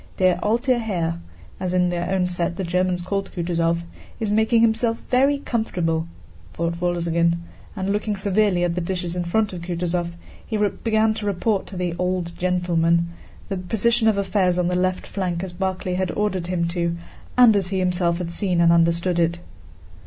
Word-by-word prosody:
"Der 185 Hz, -1 st, +3 dB
alte 240 Hz, +3 st, +2 dB
Herr" 170 Hz, -7 st, -2 dB, 0.4 s
(as 185 Hz, -1 st, -2 dB
in 180 Hz, -1 st, +3 dB
their 175 Hz, 0 st, -2 dB
own 190 Hz, -1 st, +1 dB
set 175 Hz, -1 st, -1 dB
the 190 Hz, -, -3 dB
Germans 180 Hz, 0 st, 0 dB
called 195 Hz, +2 st, -2 dB
Kutúzov) 170 Hz, -1 st, 0 dB, 0.4 s
"is 215 Hz, -2 st, -1 dB
making 220 Hz, +2 st, +3 dB
himself 230 Hz, 0 st, +2 dB
very 275 Hz, +3 st, +4 dB
comfortable," 175 Hz, -, -1 dB, 0.5 s
thought 170 Hz, +1 st, -2 dB
Wolzogen, 170 Hz, -1 st, +1 dB, 0.4 s
and 195 Hz, -1 st, -1 dB
looking 210 Hz, 0 st, -1 dB
severely 195 Hz, -2 st, +2 dB
at 175 Hz, -1 st, +1 dB
the 180 Hz, -, -2 dB
dishes 175 Hz, 0 st, -3 dB
in 180 Hz, -, -1 dB
front 205 Hz, +4 st, 0 dB
of 175 Hz, -, -6 dB
Kutúzov 175 Hz, 0 st, -2 dB, 0.3 s
he 220 Hz, -, -3 dB
began 220 Hz, +1 st, +1 dB
to 215 Hz, -1 st, -4 dB
report 200 Hz, +1 st, 0 dB
to 190 Hz, -, -8 dB
"the 175 Hz, -1 st, -1 dB
old 180 Hz, -2 st, -1 dB
gentleman" 170 Hz, -2 st, +1 dB, 0.4 s
the 195 Hz, -, -3 dB
position 225 Hz, +5 st, +1 dB
of 215 Hz, -2 st, +3 dB
affairs 190 Hz, -2 st, +1 dB
on 180 Hz, -1 st, +1 dB
the 180 Hz, -, 0 dB
left 185 Hz, 0 st, 0 dB
flank 180 Hz, -3 st, -3 dB
as 185 Hz, -2 st, -5 dB
Barclay 185 Hz, 0 st, -2 dB
had 185 Hz, 0 st, 0 dB
ordered 190 Hz, -4 st, -1 dB
him 175 Hz, -2 st, 0 dB
to 170 Hz, -1 st, -1 dB, 0.4 s
and 240 Hz, -4 st, +7 dB
as 195 Hz, -3 st, +1 dB
he 190 Hz, +1 st, -2 dB
himself 180 Hz, -2 st, +1 dB
had 175 Hz, -1 st, -4 dB
seen 180 Hz, -1 st, 0 dB
and 170 Hz, 0 st, +5 dB
understood 170 Hz, +1 st, +2 dB
it. 170 Hz, 0 st, +2 dB
180 Hz, 180 wpm, -23 LUFS, 170-205 Hz, 0.5 s, and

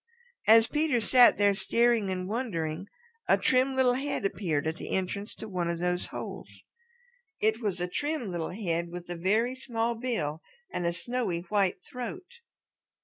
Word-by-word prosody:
As 225 Hz, +1 st, +8 dB
Peter 300 Hz, -2 st, +1 dB
sat 245 Hz, +2 st, +6 dB
there 205 Hz, -1 st, +4 dB
staring 225 Hz, +2 st, +2 dB
and 185 Hz, -1 st, -3 dB
wondering 190 Hz, -7 st, -3 dB, 0.4 s
a -, -, +5 dB
trim 260 Hz, +1 st, +2 dB
little 255 Hz, -2 st, +4 dB
head 275 Hz, -4 st, -2 dB
appeared 165 Hz, -7 st, -1 dB
at 160 Hz, +1 st, -2 dB
the -, -, -7 dB
entrance 200 Hz, +2 st, -3 dB
to 220 Hz, -, -8 dB
one 180 Hz, -4 st, -2 dB
of 170 Hz, -, -1 dB
those 180 Hz, +1 st, -1 dB
holes. -, -, -8 dB, 0.8 s
It 220 Hz, +2 st, +1 dB
was 200 Hz, -5 st, -1 dB
a 180 Hz, -, -1 dB
trim 290 Hz, -, -2 dB
little 170 Hz, -2 st, -3 dB
head 170 Hz, -4 st, -2 dB
with 175 Hz, 0 st, -8 dB
a -, -, -3 dB
very 215 Hz, +8 st, +1 dB
small 235 Hz, -3 st, -1 dB
bill 220 Hz, -11 st, -3 dB, 0.3 s
and 175 Hz, -, -1 dB
a -, -, +2 dB
snowy 180 Hz, -1 st, -2 dB
white 200 Hz, -3 st, +1 dB
throat. 250 Hz, +9 st, -6 dB
205 Hz, 165 wpm, -28 LUFS, 175-245 Hz, 0.8 s, As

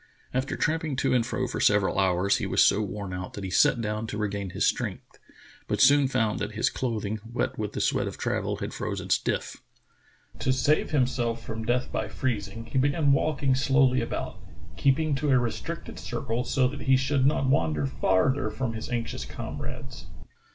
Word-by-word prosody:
After 130 Hz, +1 st, -1 dB
tramping 155 Hz, -1 st, 0 dB
to 130 Hz, -, +1 dB
and 125 Hz, -2 st, +3 dB
fro 130 Hz, +1 st, -2 dB
for -, -, -4 dB
several 105 Hz, -2 st, +3 dB
hours, 95 Hz, 0 st, +2 dB
he -, -, -2 dB
was -, -, +4 dB
so 105 Hz, -, +3 dB
worn 100 Hz, -2 st, -4 dB
out 90 Hz, 0 st, -5 dB
that 100 Hz, -, -6 dB
he 95 Hz, -, -4 dB
sat 120 Hz, -, +4 dB
down 105 Hz, 0 st, -2 dB
to 105 Hz, -, -4 dB
regain 100 Hz, -2 st, -2 dB
his 95 Hz, +2 st, 0 dB
strength, -, -, -2 dB, 0.5 s
but -, -, -1 dB
he -, -, +8 dB
soon 140 Hz, 0 st, +5 dB
found 110 Hz, -5 st, 0 dB
that 105 Hz, +1 st, -3 dB
his 110 Hz, -, +1 dB
cloth 115 Hz, -5 st, -2 dB
ing, 110 Hz, +2 st, -3 dB
wet 115 Hz, 0 st, -3 dB
with 105 Hz, -1 st, -3 dB
the -, -, -2 dB
sweat -, -, +1 dB
of -, -, -6 dB
travel, -, -, -1 dB
had -, -, -5 dB
frozen -, -, -4 dB
stiff. -, -, 0 dB, 0.8 s
To 130 Hz, -, +1 dB
save 145 Hz, +4 st, +2 dB
himself 125 Hz, -4 st, 0 dB
from 110 Hz, 0 st, -5 dB
death 125 Hz, +2 st, 0 dB
by -, -, -2 dB
freezing, 115 Hz, -3 st, -3 dB
he 120 Hz, +3 st, -1 dB
began 145 Hz, +2 st, +3 dB
walking 140 Hz, -1 st, +1 dB
slowly 130 Hz, -1 st, +3 dB
about, 115 Hz, -, -4 dB, 0.4 s
keeping 150 Hz, +3 st, +2 dB
to 145 Hz, +2 st, 0 dB
a 130 Hz, -, +5 dB
restricted 120 Hz, -2 st, -4 dB
circle 115 Hz, +2 st, -3 dB
so 130 Hz, -2 st, +2 dB
that 140 Hz, 0 st, -7 dB
he 130 Hz, +2 st, +4 dB
should 135 Hz, 0 st, +2 dB
not 140 Hz, -1 st, +2 dB
wander 80 Hz, -, +1 dB
farther 100 Hz, -, +1 dB
from 115 Hz, +2 st, -3 dB
his 110 Hz, -, -6 dB
anxious 120 Hz, -2 st, -3 dB
comrades. -, -, -7 dB
120 Hz, 195 wpm, -27 LUFS, 105-135 Hz, 0.8 s, he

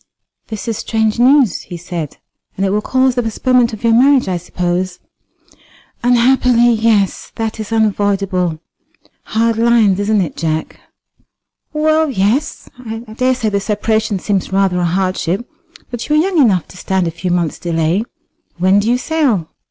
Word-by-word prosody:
"This 220 Hz, +1 st, -6 dB
is 225 Hz, -2 st, -2 dB
strange 220 Hz, 0 st, -1 dB
news," 260 Hz, -3 st, +4 dB
he 175 Hz, -, -8 dB
said, 170 Hz, -4 st, -6 dB, 0.4 s
"and 195 Hz, -, 0 dB
it 190 Hz, -, 0 dB
will 210 Hz, +1 st, +1 dB
cause 260 Hz, +3 st, +1 dB
the 245 Hz, -, 0 dB
postponement 240 Hz, +2 st, +1 dB
of 220 Hz, 0 st, -9 dB
your 230 Hz, -1 st, +3 dB
marriage, 265 Hz, +1 st, +4 dB
I 185 Hz, -2 st, -1 dB
suppose?" 180 Hz, +1 st, -3 dB, 1.0 s
"Unhappily, 245 Hz, 0 st, +3 dB
yes; 220 Hz, -4 st, +1 dB
that 225 Hz, 0 st, -3 dB
is 215 Hz, 0 st, -6 dB
unavoidable. 195 Hz, -6 st, 0 dB, 0.7 s
Hard 225 Hz, 0 st, 0 dB
lines, 225 Hz, -5 st, +3 dB
isn't 205 Hz, 0 st, +1 dB
it, 175 Hz, -, -3 dB
Jack?" 160 Hz, -1 st, -3 dB, 0.9 s
"Well, 310 Hz, 0 st, +1 dB
yes; 230 Hz, +5 st, -1 dB
I 225 Hz, -3 st, -6 dB, 0.2 s
daresay 255 Hz, -2 st, +1 dB
the 200 Hz, -1 st, 0 dB
separation 215 Hz, 0 st, -1 dB
seems 195 Hz, 0 st, -2 dB
rather 190 Hz, -2 st, +1 dB
a 175 Hz, -, +1 dB
hardship; 185 Hz, +3 st, -1 dB, 0.4 s
but 240 Hz, +2 st, -6 dB
you 300 Hz, -, +3 dB
are -, -, +4 dB
young 370 Hz, -4 st, 0 dB
enough 195 Hz, -, +2 dB
to -, -, -13 dB
stand 190 Hz, -1 st, -1 dB
a -, -, -2 dB
few 170 Hz, +3 st, -4 dB
months' 175 Hz, -3 st, -1 dB
delay. 170 Hz, +3 st, 0 dB, 0.5 s
When 185 Hz, +3 st, +3 dB
do 210 Hz, +3 st, 0 dB
you 245 Hz, -, +3 dB
sail?" 255 Hz, -, 0 dB
215 Hz, 160 wpm, -16 LUFS, 185-240 Hz, 1.0 s, news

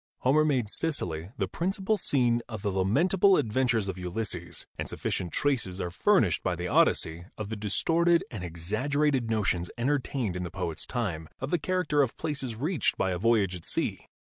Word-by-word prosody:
Homer 145 Hz, +4 st, +4 dB
made 130 Hz, -7 st, +1 dB
Sicily 90 Hz, -, -2 dB
the -, -, 0 dB
principal 195 Hz, +4 st, -1 dB
scene 120 Hz, -, +2 dB
of 110 Hz, -4 st, -6 dB
the 100 Hz, -, 0 dB
lamentable 170 Hz, -, +3 dB
adventures 115 Hz, -2 st, +1 dB
of 95 Hz, -1 st, -4 dB
Ulysses, 90 Hz, -2 st, -4 dB
and -, -, -4 dB
sufficient 90 Hz, -2 st, -3 dB
traces 115 Hz, -10 st, 0 dB
are 90 Hz, -, -3 dB
furnished 115 Hz, -, +3 dB
by 90 Hz, -, -1 dB
the 90 Hz, +1 st, -4 dB
Odyssey 85 Hz, 0 st, +2 dB
of 105 Hz, -2 st, -5 dB
the 110 Hz, -, -3 dB
distorted 165 Hz, -, +2 dB
and 105 Hz, -7 st, -6 dB
exaggerated 120 Hz, -, 0 dB
notions 100 Hz, -5 st, 0 dB
entertained 130 Hz, -5 st, -1 dB
in 90 Hz, -, -3 dB
the 90 Hz, -, -4 dB
poet's 90 Hz, -3 st, -4 dB
time 90 Hz, -10 st, -3 dB
of 135 Hz, +3 st, -4 dB
the 175 Hz, -, +2 dB
character 160 Hz, -3 st, +1 dB
of 130 Hz, -4 st, -1 dB
places 140 Hz, -7 st, -2 dB
reached 155 Hz, -, 0 dB
by 95 Hz, -, +1 dB
a 90 Hz, -, -2 dB
voyage 105 Hz, -4 st, +2 dB
at 90 Hz, -, -9 dB
sea. -, -, -2 dB
115 Hz, 175 wpm, -28 LUFS, 90-145 Hz, -, Homer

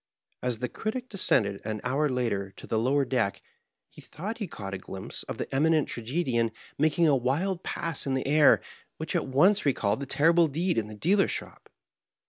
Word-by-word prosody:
As 125 Hz, -2 st, -1 dB
the 125 Hz, +2 st, -2 dB
Critic 245 Hz, -, -4 dB
descended, 105 Hz, -, +1 dB
an 110 Hz, 0 st, -3 dB
hour 140 Hz, +4 st, +1 dB
later, 115 Hz, -7 st, -1 dB
to -, -, -10 dB
the 110 Hz, -, 0 dB
lower 135 Hz, +4 st, +2 dB
deck, 120 Hz, -6 st, 0 dB, 0.5 s
he -, -, -15 dB
thought 210 Hz, +9 st, -6 dB
he 205 Hz, -, -3 dB
caught 100 Hz, -, -7 dB
a 95 Hz, -, -4 dB
glimpse 95 Hz, +1 st, -7 dB
of -, -, -6 dB
the -, -, -3 dB
Eminent 155 Hz, +2 st, +3 dB
Tragedian 120 Hz, -2 st, -1 dB, 0.2 s
making 155 Hz, +3 st, +3 dB
a 145 Hz, -, +5 dB
wild 160 Hz, +9 st, 0 dB
pass 165 Hz, -6 st, -3 dB
in 135 Hz, -, +1 dB
the 130 Hz, -, -2 dB
air, 150 Hz, +1 st, +5 dB, 0.4 s
which -, -, -4 dB
at -, -, 0 dB
once 180 Hz, +10 st, +4 dB
recalled 110 Hz, -6 st, +1 dB
the 140 Hz, -, -5 dB
terrible 165 Hz, +5 st, +4 dB
deed 165 Hz, +1 st, 0 dB
in 105 Hz, -, -4 dB
the 105 Hz, -, -9 dB
deal 190 Hz, -, +3 dB
er's -, -, +1 dB
shop. -, -, -6 dB
135 Hz, 195 wpm, -28 LUFS, 115-165 Hz, 0.5 s, a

